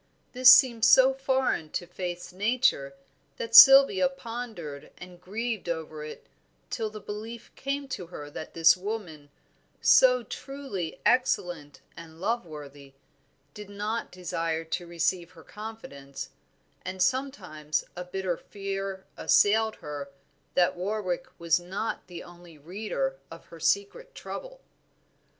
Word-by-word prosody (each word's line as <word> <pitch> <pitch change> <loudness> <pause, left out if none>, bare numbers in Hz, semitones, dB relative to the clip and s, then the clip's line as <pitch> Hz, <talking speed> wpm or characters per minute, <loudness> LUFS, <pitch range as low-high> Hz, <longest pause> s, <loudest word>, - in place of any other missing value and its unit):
This 255 0 +8
seemed 240 -4 +6
so 265 +2 +7
foreign 265 - 0
to 175 - -2
Faith's 180 0 -6
nature 205 - +1 0.4
that 230 0 -6
Sylvia 270 -2 +9
pondered 225 - -7
and 180 -1 -12
grieved 215 +1 -4
over 155 -2 -4
it 150 - -9 0.5
till 220 -2 -2
the 215 0 -9
belief 220 +3 -8
came 275 +1 -4
to 180 -9 -5
her 150 -4 -9
that 155 - -8
this 165 -1 +6
woman, 180 -7 -6 0.5
so - - +5
truly 270 - -6
excellent 175 - 0
and 165 -1 -12
loveworthy, 150 - -5 0.6
did 210 -1 -10
not 210 +3 -4
desire 165 -3 -3
to 170 +2 -4
receive 170 +1 -1
her 160 - -15
confidence, 205 -11 -9 0.5
and 185 +1 -6
sometimes 185 - -1
a 180 - -5
bitter 180 -1 -3
fear 195 -1 -6
assailed 220 +1 +3
her 145 -1 -6 0.5
that 175 -1 +3
Warwick 195 +4 -3
was 170 0 +2
not 190 +5 -5
the 175 -2 -9
only 175 -2 -15
reader 145 -5 -4
of 165 0 -12
her 165 - -10
secret 200 - -1
trouble. - - -8
185 Hz, 125 wpm, -27 LUFS, 165-225 Hz, 0.6 s, Sylvia